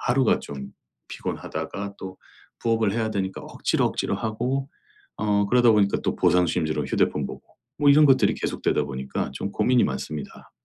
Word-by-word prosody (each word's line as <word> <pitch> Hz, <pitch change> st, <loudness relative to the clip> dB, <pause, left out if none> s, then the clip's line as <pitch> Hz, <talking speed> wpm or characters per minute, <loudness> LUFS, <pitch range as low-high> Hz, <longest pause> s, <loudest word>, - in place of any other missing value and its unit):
하루가 130 Hz, -1 st, +2 dB
좀 70 Hz, -2 st, -7 dB, 0.4 s
피곤하다가 100 Hz, 0 st, -5 dB
또 95 Hz, 0 st, -8 dB, 0.4 s
부업을 115 Hz, -3 st, +1 dB
해야 110 Hz, -1 st, -1 dB
되니까 95 Hz, -2 st, -3 dB
억지로 -, -, 0 dB
억지로 -, -, -1 dB
하고 125 Hz, +5 st, -2 dB, 0.5 s
어 105 Hz, -1 st, +1 dB
그러다 120 Hz, +1 st, +5 dB
보니까 100 Hz, -2 st, +3 dB
또 -, -, 0 dB
보상심리로 85 Hz, -3 st, +2 dB
휴대폰 -, -, 0 dB
보고 -, -, -9 dB, 0.4 s
뭐 145 Hz, -1 st, +5 dB
이런 150 Hz, +1 st, +7 dB
것들이 135 Hz, -, +4 dB
계속되다 75 Hz, -, -1 dB
보니까 65 Hz, -1 st, -4 dB
좀 100 Hz, -, -4 dB
고민이 120 Hz, +4 st, +3 dB
많습니다. 70 Hz, +2 st, -5 dB
105 Hz, 365 characters per minute, -24 LUFS, 90-120 Hz, 0.5 s, 이런